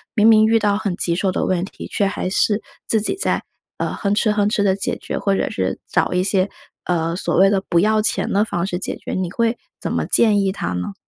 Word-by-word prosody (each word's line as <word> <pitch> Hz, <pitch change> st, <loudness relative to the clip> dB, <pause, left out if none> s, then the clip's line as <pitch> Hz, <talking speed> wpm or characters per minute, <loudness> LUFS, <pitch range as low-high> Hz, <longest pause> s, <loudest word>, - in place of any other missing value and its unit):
明 215 Hz, -1 st, +5 dB
明 220 Hz, -1 st, +6 dB
遇 225 Hz, +1 st, +4 dB
到 205 Hz, -2 st, +1 dB
很 200 Hz, -4 st, -2 dB
棘 170 Hz, -, 0 dB
手 190 Hz, +1 st, 0 dB
的 -, -, -1 dB
问 180 Hz, -2 st, 0 dB
题， 195 Hz, -, -8 dB
却 200 Hz, -, 0 dB
还 195 Hz, -1 st, -3 dB
是 210 Hz, +1 st, +2 dB, 0.3 s
自 220 Hz, -, +2 dB
己 380 Hz, -, -1 dB
在， 390 Hz, -, -1 dB, 0.3 s
呃， -, -, -2 dB
哼 200 Hz, -1 st, 0 dB
哧 215 Hz, 0 st, +2 dB
哼 205 Hz, -1 st, +2 dB
哧 210 Hz, -1 st, +1 dB
地 190 Hz, -2 st, +3 dB
解 195 Hz, -, -2 dB
决， -, -, -5 dB
或 195 Hz, -1 st, +1 dB
者 -, -, -1 dB
是 95 Hz, 0 st, -2 dB
找 -, -, +1 dB
一 180 Hz, 0 st, +1 dB
些， 195 Hz, 0 st, +1 dB, 0.4 s
呃， 165 Hz, -1 st, 0 dB
所 185 Hz, -, -1 dB
谓 195 Hz, +2 st, +5 dB
的 195 Hz, -2 st, +1 dB
不 170 Hz, -, +3 dB
要 215 Hz, +3 st, +3 dB
钱 215 Hz, -, 0 dB
的 205 Hz, -, +3 dB
方 175 Hz, -4 st, -2 dB
式 180 Hz, -2 st, -3 dB
解 -, -, -3 dB
决， -, -, -7 dB
你 185 Hz, -2 st, -2 dB
会 230 Hz, +4 st, 0 dB, 0.2 s
怎 -, -, -4 dB
么 -, -, -1 dB
建 210 Hz, -3 st, +4 dB
议 195 Hz, -1 st, +1 dB
他 85 Hz, -, -4 dB
呢？ 90 Hz, +2 st, -4 dB
200 Hz, 270 characters per minute, -20 LUFS, 180-215 Hz, 0.4 s, 明